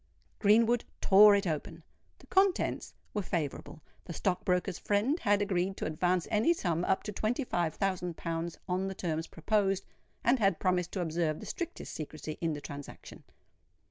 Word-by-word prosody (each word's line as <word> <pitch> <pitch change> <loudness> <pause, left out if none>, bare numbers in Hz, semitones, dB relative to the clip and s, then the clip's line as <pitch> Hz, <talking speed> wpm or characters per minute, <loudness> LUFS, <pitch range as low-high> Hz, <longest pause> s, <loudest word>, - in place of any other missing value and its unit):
Greenwood 230 +3 +4 0.2
tore 205 +1 +7
it 200 0 0
open: 160 0 -4 0.3
the - - -18
contents 385 -1 +1 0.2
were 210 - 0
favourable. 155 -4 -4 0.2
The 170 - -6
stock 185 +1 -1
broker's 180 -1 0
friend 220 - +1
had 205 -1 +2
agreed 190 -1 -1
to - - -3
advance 175 +3 0
any 225 +10 +4
sum 170 - -1
up 190 - +1
to 210 - -4
twenty 220 +7 -1
five 170 -9 -1
thousand 180 -3 -2
pounds 165 0 -3
on 185 +1 -1
the 190 - -5
terms 165 -3 -2
proposed, 195 +2 0 0.4
and 245 +2 +3
had 195 -5 +3
promised 180 -2 +1
to 190 - -1
observe 160 -2 -1
the - - -9
strictest 345 -1 -5
secrecy 155 0 -6
in 165 -2 0
the 145 - -6
transaction. 145 0 -9
185 Hz, 170 wpm, -31 LUFS, 165-210 Hz, 0.4 s, tore